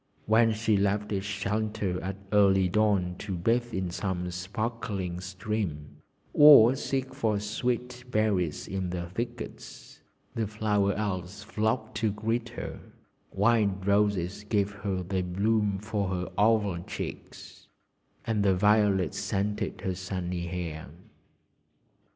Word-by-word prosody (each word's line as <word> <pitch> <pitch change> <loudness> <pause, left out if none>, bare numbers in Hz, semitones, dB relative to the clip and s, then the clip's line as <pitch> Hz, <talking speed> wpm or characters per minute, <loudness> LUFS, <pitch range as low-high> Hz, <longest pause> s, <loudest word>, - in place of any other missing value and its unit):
When 115 +1 +4
she 110 -1 +1
left 100 +1 0
its 100 0 -2
shelter 105 -1 -2
at 95 +1 -3 0.2
early 95 -2 +5
dawn 100 -2 +2
to 100 -3 -4
bathe 120 +7 +1
in 95 -4 -2
some 90 -1 -3
sparkling 100 -1 -3
stream, 95 -5 -4 0.4
or 140 -5 +9
seek 135 0 -2
for 110 -3 0
sweet 125 +4 -2
berries 100 -9 0
in 95 -1 -3
the 85 -1 -3
thickets, 120 +6 -7 0.3
the 110 -2 -1
Flower 105 -1 +1
Elves 100 -1 -3
flocked 110 +3 -1
to 110 - +1
greet 115 +3 -2
her; 120 - -6 0.5
wild 100 -2 +2
roses 100 -1 +1
gave 105 -1 0
her 100 -2 -3
their 95 +1 -1
bloom 100 +3 +1
for 105 -1 -2
her 90 -1 -3
oval 105 -4 +2
cheeks, - - -8 0.6
and 110 -2 0
the 95 -2 +4
violets 105 -2 +3
scented 105 +1 -2
her 95 - -1
sunny 90 -2 -4
hair. 85 -3 -5
100 Hz, 125 wpm, -28 LUFS, 95-110 Hz, 0.6 s, or